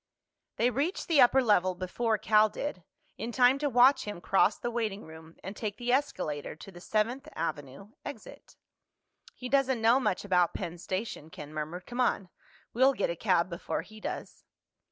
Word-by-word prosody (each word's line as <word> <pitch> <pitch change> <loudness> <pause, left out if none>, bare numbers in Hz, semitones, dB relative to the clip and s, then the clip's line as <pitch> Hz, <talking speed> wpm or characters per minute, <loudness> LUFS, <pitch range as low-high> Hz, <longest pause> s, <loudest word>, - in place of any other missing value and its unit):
They 245 +2 +2
reached 290 - -2
the 315 -5 +5
upper 260 +2 +5
level 185 -5 +3
before 215 +5 -1
Cal 215 +1 +4
did, 205 - -5 0.4
in 225 +4 -4
time 250 +2 +4
to 290 0 0
watch 260 +2 +5
him 205 -4 -5
cross 195 +3 +2
the 240 - -3
waiting 220 -4 -2
room 160 +1 -13
and 195 +3 -6
take 210 -1 -4
the 245 +1 -2
escalator 245 - -1
to 195 - -12
the 175 -1 -13
Seventh 235 +9 -1
Avenue 145 +5 -5
exit. - - -10 0.8
"He 250 - -6
doesn't 265 -2 +2
know 230 +4 +4
much 205 -7 -1
about 180 -3 +2
Penn 170 +1 -5
Station," 185 -4 -4
Ken 150 -1 -10
murmured. 155 +4 -5
"Come 245 +1 -3
on. 200 -6 0 0.4
We'll 260 +3 +4
get 205 - -1
a - - -4
cab 180 -2 +2
before 170 -2 -4
he 215 0 -14
does." - - -6
215 Hz, 175 wpm, -29 LUFS, 180-250 Hz, 0.8 s, the